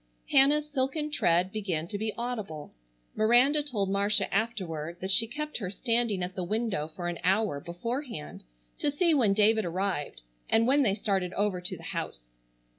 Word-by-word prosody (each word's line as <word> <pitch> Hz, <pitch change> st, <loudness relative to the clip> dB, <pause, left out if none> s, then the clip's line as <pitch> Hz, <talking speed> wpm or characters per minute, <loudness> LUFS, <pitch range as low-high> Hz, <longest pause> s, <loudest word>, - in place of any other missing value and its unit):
Hannah's 295 Hz, +2 st, +5 dB
silken 295 Hz, +2 st, -1 dB
tread 180 Hz, -, +2 dB
began 185 Hz, -7 st, -2 dB
to 205 Hz, -, -3 dB
be 220 Hz, +1 st, -1 dB
audible. 215 Hz, -11 st, -5 dB, 0.4 s
Miranda 245 Hz, +7 st, +4 dB
told 215 Hz, -10 st, -2 dB
Marcia 200 Hz, +1 st, +1 dB
afterward 175 Hz, -7 st, -2 dB
that 190 Hz, +1 st, -1 dB
she 225 Hz, +4 st, +4 dB
kept 300 Hz, +5 st, -4 dB
her 195 Hz, -6 st, -4 dB
standing 230 Hz, -2 st, 0 dB
at 180 Hz, +1 st, -4 dB
the 185 Hz, -, -3 dB
window 210 Hz, -4 st, -1 dB
for 175 Hz, +2 st, -6 dB
an 175 Hz, -1 st, -3 dB
hour 190 Hz, -4 st, +2 dB
beforehand 230 Hz, -, -5 dB, 0.4 s
to -, -, +1 dB
see 325 Hz, +4 st, +2 dB
when 235 Hz, -9 st, +3 dB
David 215 Hz, +1 st, +4 dB
arrived, 175 Hz, -, -2 dB, 0.3 s
and 225 Hz, +1 st, +4 dB
when 275 Hz, +4 st, +4 dB
they 205 Hz, -7 st, +2 dB
started 190 Hz, -4 st, -1 dB
over 200 Hz, -3 st, 0 dB
to 180 Hz, -, -3 dB
the -, -, -13 dB
house. -, -, -6 dB
210 Hz, 170 wpm, -29 LUFS, 180-240 Hz, 0.4 s, Hannah's